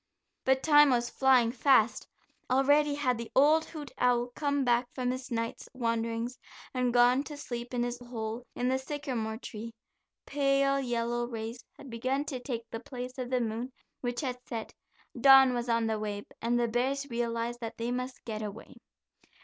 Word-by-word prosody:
But 265 0 +3
time 295 -2 +7
was 240 -2 +1
flying 255 -3 +4
fast; 240 -2 +3 0.4
already 285 +3 +4
had 255 -5 0
the 235 - -6
old 305 +4 +5
hoot 300 -3 -8
owl 245 0 +2
come 285 -2 0
back 240 0 +2
from 250 -1 0
his 255 +1 -5
night's 230 -1 -3
wanderings, 230 0 -2 0.3
and 250 -1 +1
gone 245 +2 +5
to 295 - -7
sleep 240 -4 -6
in 245 -1 0
his 245 0 -3
hole 235 -1 -5
in 245 - -1
the 260 +1 +1
sycamore 260 -6 -3
tree. 230 -1 -8 0.5
Pale 275 -1 +2
yellow 240 -1 -1
rays 230 0 -6
had 275 -3 -11
begun 260 +5 -1
to 265 -4 -4
take 235 -3 -5
the 225 - -4
place 250 +1 -7
of 250 -1 -3
the 255 -1 +1
moon 230 +3 -3 0.3
which 245 +1 -3
had 250 -3 -3
set; 225 -2 -5 0.4
dawn 265 +1 +7
was 240 0 -2
on 230 -1 +2
the 220 -1 -1
way, 205 -1 -4 0.2
and 240 +1 +1
the 240 - +2
bears 260 +4 0
realized 235 0 -2
that 230 -1 -6
they 235 +1 -2
must 250 +1 -4
get 220 -2 -4
away. 215 +4 -7
245 Hz, 175 wpm, -30 LUFS, 230-265 Hz, 0.5 s, time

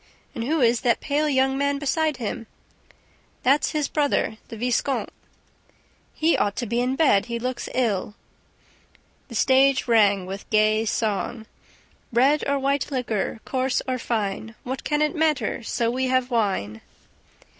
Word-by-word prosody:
"And 230 - -4
who 310 +3 0
is 235 -1 +3
that 235 -2 +2
pale 300 +1 0
young 265 -1 +2
man 280 0 +1
beside 300 +1 0
him?" 230 -1 -5 1.0
"That's 275 +3 +3
his 300 -2 -1
brother, 285 -7 0
the 225 - -8
viscount." 250 +3 -1 1.0
"He 320 +2 +2
ought 200 -1 0
to 245 - -3
be 235 +2 0
in 250 - 0
his - - -5
bed. 250 -10 +3
He 235 -1 -3
looks 250 +1 -4
ill." 210 -5 0 1.1
The 235 - -9
stage 265 +2 +3
rang 205 -5 +4
with 195 +2 -8
gay 215 +1 +3
song: 220 +1 -2 0.7
"Red 270 +5 +3
or 280 - +2
white 275 0 0
liquor, 235 -5 -2
Coarse 260 -1 0
or 255 -1 -1
fine! 220 -1 -3
What 260 +1 -5
can 300 0 +1
it 300 - 0
matter, 310 -5 0
So 230 0 -1
we 260 +2 -1
have 255 0 +1
wine?" 190 - -1
250 Hz, 155 wpm, -24 LUFS, 220-275 Hz, 1.1 s, rang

